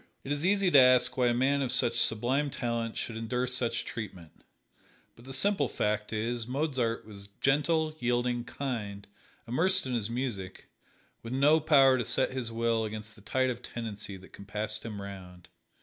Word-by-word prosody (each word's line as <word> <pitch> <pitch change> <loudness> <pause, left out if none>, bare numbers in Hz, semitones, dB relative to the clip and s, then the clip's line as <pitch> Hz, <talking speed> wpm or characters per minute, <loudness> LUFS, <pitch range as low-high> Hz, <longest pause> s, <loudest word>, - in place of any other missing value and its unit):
It 135 - -6
is 145 +1 -1
easy 195 0 +3
to 140 - +8
ask 125 -1 +5
why 125 -2 +2
a 120 - +3
man 135 +3 +2
of 130 -3 0
such 120 -1 +3
sublime 130 +6 +1
talent 115 -3 -3
should 115 - -4
endure 115 +3 -1
such 120 -2 -1
treatment, 95 -8 -8 0.7
but 120 - -17
the 135 - -9
simple 145 +2 +2
fact 105 -1 -2
is 115 +1 -2
Mozart 130 -4 -1
was 100 -2 -11
gentle, 155 +3 +1
yielding, 120 0 0
kind 105 -7 -5 0.4
immersed 180 +10 +3
in 130 - -3
his 115 -3 -1
music 115 -7 -5 0.5
with 115 +2 -6
no 145 +4 +4
power 135 -4 +5
to - - 0
set - - +1
his 130 -3 -4
will 115 0 0
against 110 0 -5
the 105 - -17
tide 130 +5 0
of 120 0 -7
tendency 105 -5 -6
that 95 - -16
'compassed 105 +2 -5
him 105 -3 -6
round. 95 -3 -10
120 Hz, 175 wpm, -29 LUFS, 110-135 Hz, 0.7 s, to